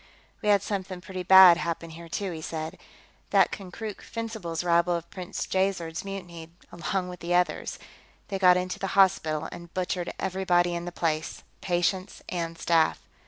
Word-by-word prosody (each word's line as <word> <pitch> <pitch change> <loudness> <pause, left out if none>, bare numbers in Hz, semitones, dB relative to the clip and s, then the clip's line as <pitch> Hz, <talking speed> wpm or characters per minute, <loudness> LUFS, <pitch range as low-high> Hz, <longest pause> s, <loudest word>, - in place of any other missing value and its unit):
"We 210 - 0
had 200 -1 +4
something 190 -3 -4
pretty 185 0 -6
bad 185 -1 +9
happen 165 -1 -3
here, 165 +1 -10
too," 195 +3 -3
he 160 -2 -6
said. 160 +3 -5 0.5
"That - - +4
Konkrook 200 +2 -7
Fencibles 220 -8 -4
rabble 170 0 +3
of 170 0 -5
Prince 185 +1 -5
Jaizerd's 185 -4 -1
mutinied, 175 -4 -7 0.2
along 180 +2 -2
with 180 -1 -8
the 175 +1 -1
others; 180 0 0 0.5
they 195 -2 -2
got 180 -1 +6
into 180 0 -3
the 195 0 -3
hospital 160 -5 +3
and 170 0 -10
butchered 180 -1 -2
everybody 180 -2 +1
in 170 0 -3
the 175 - -5
place, 160 -2 -2 0.2
patients 185 +1 -1
and 165 -2 -3
staff. 165 -1 +2
180 Hz, 165 wpm, -27 LUFS, 170-190 Hz, 0.5 s, bad